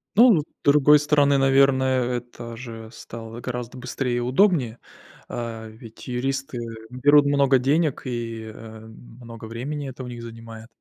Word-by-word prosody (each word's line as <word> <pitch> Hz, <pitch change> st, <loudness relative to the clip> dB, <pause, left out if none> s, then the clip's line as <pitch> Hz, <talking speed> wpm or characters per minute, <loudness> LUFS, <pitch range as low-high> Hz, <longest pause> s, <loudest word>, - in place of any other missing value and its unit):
Ну 240 Hz, +4 st, +8 dB
ну, 160 Hz, -, +2 dB
с -, -, -9 dB, 0.2 s
другой 150 Hz, +1 st, +6 dB
стороны, 145 Hz, -1 st, +3 dB
наверное, 135 Hz, -1 st, +3 dB
это 120 Hz, -1 st, -9 dB
же 115 Hz, -2 st, -9 dB
стало 115 Hz, 0 st, -9 dB
гораздо 125 Hz, 0 st, -5 dB
быстрее 125 Hz, 0 st, -3 dB
и -, -, 0 dB
удобнее. 130 Hz, -, +2 dB, 0.5 s
А, 115 Hz, -2 st, -5 dB
ведь, 110 Hz, +2 st, -13 dB
юристы, 135 Hz, +1 st, -3 dB
э, 115 Hz, -1 st, -7 dB
берут 145 Hz, +4 st, +4 dB
много 140 Hz, -2 st, +3 dB
денег, 145 Hz, +3 st, +1 dB
и, 115 Hz, -3 st, -5 dB
э, 110 Hz, 0 st, -11 dB
много 115 Hz, 0 st, -12 dB
времени 135 Hz, +6 st, -5 dB
это 130 Hz, 0 st, -8 dB
у 125 Hz, -, -7 dB
них 120 Hz, -1 st, -8 dB
занимает. 115 Hz, -1 st, -10 dB
125 Hz, 155 wpm, -23 LUFS, 115-140 Hz, 0.5 s, Ну